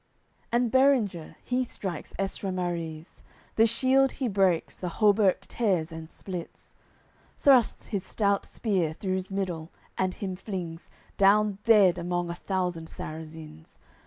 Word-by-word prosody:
CII - - -40
And 240 -1 +2
Berenger, 255 - +2
he 255 +1 0
strikes 190 -9 -6
Estramariz, 175 -4 -3 0.3
The 225 +1 +5
shield 260 +4 +3
he 260 - -2
breaks, 190 -5 +1
the 180 - -3
hauberk 205 0 +3
tears 190 -6 -1
and 160 0 -8
splits, 180 -3 -8 0.6
Thrusts 260 -5 +4
his 200 -4 -2
stout 200 -2 0
spear 185 -8 -1
through's 185 +1 -3
middle, 180 -5 -3 0.3
and 185 -1 0
him 190 -2 -4
flings 180 -4 -6 0.3
Down 200 0 +4
dead 200 -6 +5
among 175 0 -2
a - - -5
thousand 180 -3 -2
Sarrazins. 160 0 -9
190 Hz, 130 wpm, -27 LUFS, 170-210 Hz, 0.6 s, The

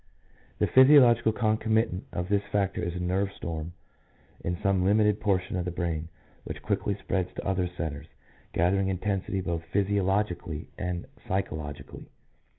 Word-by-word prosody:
The - - +2
physiological 130 -4 +6
concomitant 110 -3 +1
of 90 0 -3
this 100 0 +2
factor 100 -2 0
is 85 0 -3
a - - -3
nerve 95 +2 0
storm 80 0 -5 0.7
in 90 0 -1
some 100 -2 +2
limited 105 +1 +3
portion 95 -3 0
of 90 - -1
the - - -1
brain 85 -2 -3 0.3
which - - -7
quickly 100 - 0
spreads 95 -2 -2
to - - -5
other 95 -2 +1
centres, 80 -4 -5 0.4
gathering 95 +3 +2
intensity 95 0 -1
both 85 -2 -2
physiologically 95 -4 0
and 90 -1 -3 0.2
psychologically. 75 -6 -4
95 Hz, 140 wpm, -28 LUFS, 85-100 Hz, 0.7 s, physiological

